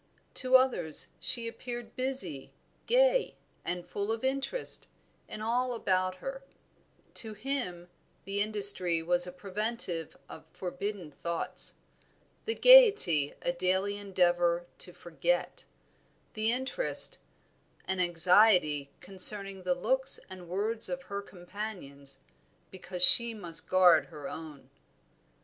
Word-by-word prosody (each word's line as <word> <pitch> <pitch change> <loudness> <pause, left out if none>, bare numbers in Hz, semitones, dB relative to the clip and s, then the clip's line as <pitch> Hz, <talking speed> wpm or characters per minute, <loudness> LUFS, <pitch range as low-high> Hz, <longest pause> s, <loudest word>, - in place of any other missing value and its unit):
To 260 0 +1
others 255 - +3
she 235 -1 +3
appeared 240 0 -8
busy, 255 - -5 0.4
gay, - - +2 0.3
and 175 0 -5
full 200 +2 -4
of 225 +1 -4
interest 275 - -1 0.4
in 215 - -7
all 245 +3 -1
about 185 -4 -1
her; 270 +8 -8 0.7
to 220 -3 -4
him, 215 -8 -5 0.4
the 200 +1 -3
industry 200 -5 +5
was 175 +1 0
a - - -7
preventive 190 -2 -5
of - - -13
forbidden 190 -2 -6
thoughts; 170 +4 -4 0.7
the 450 - -3
gayety 420 - +6
a - - 0
daily 185 +3 -1
endeavor 175 -3 0
to - - +1
forget; - - -3 0.7
the 220 +1 -1
interest, 265 - +1 0.7
an 190 0 -3
anxiety 175 -4 +3
concerning 195 +1 +2
the 180 -1 -1
looks 260 +9 0
and 180 -2 -11
words 215 +5 -1
of 270 0 -5
her 200 -3 -6
companions, 175 -9 -8 0.5
because 180 -1 -2
she 230 +5 +8
must 170 -5 -7
guard 175 -6 +4
her 150 -1 -10
own. 155 -3 -10
195 Hz, 115 wpm, -29 LUFS, 175-235 Hz, 0.7 s, she